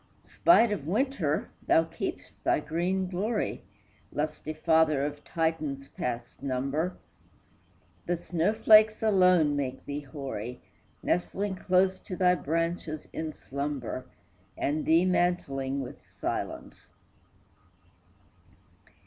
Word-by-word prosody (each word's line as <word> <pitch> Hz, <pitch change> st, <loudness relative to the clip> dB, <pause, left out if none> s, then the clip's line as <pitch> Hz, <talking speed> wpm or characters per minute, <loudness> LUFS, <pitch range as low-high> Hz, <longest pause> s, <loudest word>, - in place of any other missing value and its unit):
Spite 235 Hz, -10 st, +4 dB
of 155 Hz, -8 st, -3 dB
winter, 200 Hz, -, 0 dB, 0.2 s
thou 165 Hz, -, +5 dB
keep'st 165 Hz, 0 st, -6 dB
thy -, -, +3 dB
green 175 Hz, +5 st, -1 dB
glory, 205 Hz, +5 st, -2 dB, 0.5 s
Lusty 150 Hz, +1 st, -3 dB
father 155 Hz, -2 st, +3 dB
of 145 Hz, 0 st, -5 dB
Titans 155 Hz, -4 st, -2 dB
past 120 Hz, -1 st, -5 dB
number! 140 Hz, +6 st, -1 dB, 1.1 s
The 175 Hz, -, +1 dB
snow 175 Hz, +3 st, 0 dB
flakes 215 Hz, 0 st, +6 dB
alone 180 Hz, -8 st, +4 dB
make 135 Hz, -2 st, -3 dB
thee 145 Hz, 0 st, -3 dB
hoary, 130 Hz, -4 st, -6 dB, 0.4 s
Nestling 190 Hz, +3 st, -1 dB
close 185 Hz, 0 st, +2 dB
to 185 Hz, -, -7 dB
thy 180 Hz, 0 st, +4 dB
branches 165 Hz, -1 st, -2 dB
in 160 Hz, -1 st, -3 dB
slumber, 140 Hz, -4 st, -4 dB, 0.5 s
And 150 Hz, +2 st, -1 dB
thee 165 Hz, +3 st, +5 dB
mantling 140 Hz, -7 st, 0 dB
with 130 Hz, -, -8 dB
silence. -, -, -5 dB
160 Hz, 105 wpm, -29 LUFS, 140-185 Hz, 1.1 s, flakes